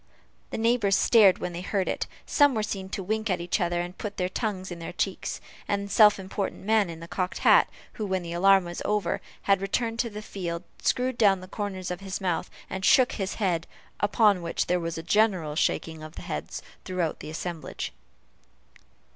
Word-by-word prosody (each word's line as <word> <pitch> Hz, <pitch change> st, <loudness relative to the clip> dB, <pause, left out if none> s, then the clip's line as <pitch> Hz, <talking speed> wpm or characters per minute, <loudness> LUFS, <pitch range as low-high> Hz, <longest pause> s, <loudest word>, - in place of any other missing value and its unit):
The -, -, -4 dB
neighbors 225 Hz, -3 st, +3 dB
stared 210 Hz, -5 st, +6 dB
when 175 Hz, -, -4 dB
they 170 Hz, -, -5 dB
heard 190 Hz, 0 st, -1 dB
it; -, -, -1 dB, 0.2 s
some 285 Hz, -3 st, +4 dB
were 215 Hz, -, 0 dB
seen 195 Hz, -3 st, -4 dB
to 195 Hz, -, -4 dB
wink 220 Hz, +3 st, -1 dB
at 185 Hz, -2 st, +1 dB
each 175 Hz, +2 st, -1 dB
other, 175 Hz, 0 st, +1 dB
and 175 Hz, +1 st, -6 dB
put 205 Hz, 0 st, -6 dB
their 180 Hz, -1 st, 0 dB
tongues 190 Hz, -3 st, -3 dB
in 175 Hz, -, -6 dB
their 165 Hz, -, -6 dB
cheeks; 190 Hz, +1 st, -2 dB, 0.3 s
and 200 Hz, 0 st, 0 dB
the 200 Hz, -, -9 dB
self 210 Hz, -2 st, +7 dB
important 190 Hz, 0 st, -4 dB
man 215 Hz, -3 st, +3 dB
in 165 Hz, -1 st, -8 dB
the 170 Hz, -, -8 dB
cocked 185 Hz, +1 st, -2 dB
hat, -, -, +7 dB, 0.2 s
who, 215 Hz, -3 st, -4 dB
when 190 Hz, -2 st, -1 dB
the 170 Hz, 0 st, -5 dB
alarm 195 Hz, +1 st, +5 dB
was 175 Hz, 0 st, -6 dB
over, 205 Hz, -5 st, 0 dB, 0.2 s
had 195 Hz, -1 st, +3 dB
returned 225 Hz, +4 st, -1 dB
to 235 Hz, -, +1 dB
the 210 Hz, 0 st, -7 dB
field, 175 Hz, -4 st, -4 dB, 0.2 s
screwed 250 Hz, 0 st, 0 dB
down 200 Hz, -4 st, +5 dB
the 185 Hz, -, -10 dB
corners 190 Hz, -2 st, -4 dB
of 180 Hz, -, -4 dB
his 195 Hz, -1 st, -5 dB
mouth, 180 Hz, -3 st, -1 dB, 0.2 s
and 190 Hz, -, -5 dB
shook 255 Hz, +5 st, +5 dB
his 195 Hz, -2 st, -3 dB
head 180 Hz, -5 st, 0 dB, 0.3 s
upon 205 Hz, -2 st, +3 dB
which 170 Hz, 0 st, -1 dB
there 180 Hz, 0 st, +1 dB
was 165 Hz, -1 st, -3 dB
a 165 Hz, -, -5 dB
general 185 Hz, -6 st, +2 dB
shaking 160 Hz, 0 st, 0 dB
of 155 Hz, +1 st, -9 dB
the -, -, -8 dB
head -, -, -4 dB, 0.3 s
throughout 180 Hz, -4 st, -2 dB
the -, -, -7 dB
assemblage. 160 Hz, -, -5 dB
190 Hz, 205 wpm, -27 LUFS, 175-210 Hz, 0.3 s, self